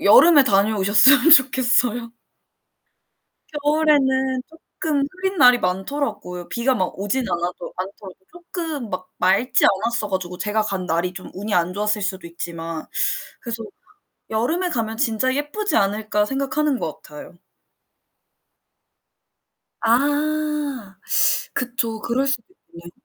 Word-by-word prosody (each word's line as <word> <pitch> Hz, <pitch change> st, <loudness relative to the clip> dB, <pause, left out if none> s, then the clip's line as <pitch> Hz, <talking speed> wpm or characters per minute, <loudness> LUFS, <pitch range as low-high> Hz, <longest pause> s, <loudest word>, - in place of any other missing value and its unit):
여름에 290 Hz, +8 st, +7 dB
다녀오셨으면 210 Hz, +7 st, +4 dB
좋겠어요. 245 Hz, -4 st, +4 dB, 1.5 s
겨울에는 265 Hz, -4 st, +2 dB, 0.4 s
쪼끔 295 Hz, -3 st, 0 dB
흐린 380 Hz, +1 st, -3 dB
날이 250 Hz, -2 st, +7 dB
많더라고요. 190 Hz, -2 st, -3 dB
비가 250 Hz, +2 st, 0 dB
막 185 Hz, -3 st, -2 dB
오진 205 Hz, +7 st, -1 dB
않아도 175 Hz, 0 st, -3 dB
않더라도 190 Hz, 0 st, -7 dB, 0.2 s
쪼끔 335 Hz, -, -6 dB
막 185 Hz, 0 st, -5 dB
맑지 195 Hz, +8 st, +2 dB
않았어 215 Hz, +2 st, 0 dB
가지고 180 Hz, -2 st, -4 dB
제가 215 Hz, +2 st, 0 dB
간 195 Hz, -3 st, -3 dB
날이 170 Hz, +3 st, -1 dB
좀 185 Hz, -, -10 dB
운이 205 Hz, +3 st, -3 dB
안 175 Hz, 0 st, +1 dB
좋았을 210 Hz, +1 st, -1 dB
수도 190 Hz, -3 st, -3 dB
있지만. 165 Hz, -1 st, -6 dB, 0.5 s
그래서 230 Hz, -2 st, -5 dB, 0.7 s
'여름에 295 Hz, +12 st, 0 dB
가면 225 Hz, -5 st, -3 dB
진짜 260 Hz, 0 st, 0 dB
예쁘지 295 Hz, +9 st, -2 dB
않을까.' 210 Hz, +1 st, 0 dB
생각하는 275 Hz, +2 st, -1 dB
것 155 Hz, -, -5 dB
같아요. 150 Hz, +3 st, -12 dB, 2.5 s
아. 290 Hz, -2 st, 0 dB, 0.6 s
그쵸. 235 Hz, -3 st, -2 dB
그럴 245 Hz, +5 st, -1 dB
수도 270 Hz, -4 st, 0 dB, 0.3 s
있네. 170 Hz, 0 st, -11 dB
230 Hz, 265 characters per minute, -21 LUFS, 195-275 Hz, 2.5 s, 여름에